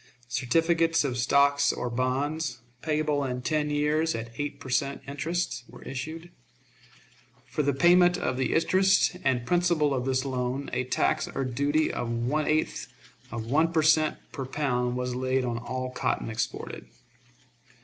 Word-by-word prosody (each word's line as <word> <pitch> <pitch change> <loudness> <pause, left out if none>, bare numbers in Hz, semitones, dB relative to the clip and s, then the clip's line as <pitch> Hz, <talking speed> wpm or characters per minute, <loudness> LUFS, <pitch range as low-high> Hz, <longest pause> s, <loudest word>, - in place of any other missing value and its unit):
Certificates 165 +6 +2
of 135 -4 -1
stock 140 +3 +3 0.2
or - - -2
bonds, 130 +3 -1 0.2
payable 150 -2 0
in 125 -2 -3
ten 150 +2 0
years 150 +2 +1
at 115 0 -5
eight 145 -1 -3
per 140 - -10
cent. 140 +1 0
interest, 155 -1 -2
were - - -13
issued. 160 +6 -6 1.1
For - - -2
the 140 -2 +1
payment 175 +3 +5
of 130 - -1
the 130 -1 0
interest 190 +3 +3
and 125 -3 +1
principal 170 -3 +2
of 125 -2 -1
this 130 0 0
loan 130 +1 -2
a 130 - 0
tax 125 - +1
or 135 - -3
duty 145 +5 +1
of 120 - -3
one 125 +6 -1
eighth 155 +1 0 0.4
of 115 -1 -5
one 155 +7 +2
per 160 -2 +2
cent. 155 0 +4
per 135 -4 -5
pound 125 -4 -1
was 125 0 -2
laid 130 +1 0
on 120 -1 -2
all 130 +2 -4
cotton 120 - -1
exported. 110 - -4
140 Hz, 155 wpm, -27 LUFS, 125-155 Hz, 1.1 s, payment